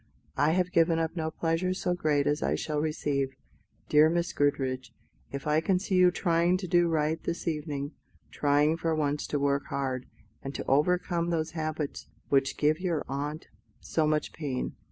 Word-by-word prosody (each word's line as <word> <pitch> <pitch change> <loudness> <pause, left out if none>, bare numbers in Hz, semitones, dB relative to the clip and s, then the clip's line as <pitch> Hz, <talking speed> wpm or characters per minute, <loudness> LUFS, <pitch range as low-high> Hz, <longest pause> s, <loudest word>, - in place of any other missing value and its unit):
"I 150 +2 +3
have 180 0 +1
given 165 -2 +3
up 165 +1 -1
no 160 -2 -1
pleasure 165 +3 -1
so 180 -1 0
great 150 -5 +1
as 150 +1 +1
I - - +1
shall 150 -1 -2
receive, 140 -3 -1 0.5
dear 150 +1 +6
Miss 170 +1 0
Goodriche, 130 -4 0 0.4
if 140 0 -5
I 150 +1 +2
can 185 +2 +2
see 190 +1 -3
you 180 -1 +6
trying 175 0 +2
to 185 0 -5
do 175 0 +4
right 160 0 0
this 170 - -4
evening: 150 -3 -2 0.4
trying 150 +2 +2
for 165 -1 0
once 150 -1 -1
to 150 - -1
work 140 0 0
hard, 130 -2 -3 0.3
and 135 +1 -6
to - - -4
overcome 170 +4 +1
those 160 -2 -1
habits 155 -2 -4 0.2
which 135 -1 +2
give 155 +2 +2
your 175 -4 -1
aunt 145 +3 -4 0.3
so 160 -2 0
much 150 0 0
pain. 140 -5 -3
155 Hz, 175 wpm, -29 LUFS, 145-170 Hz, 0.5 s, dear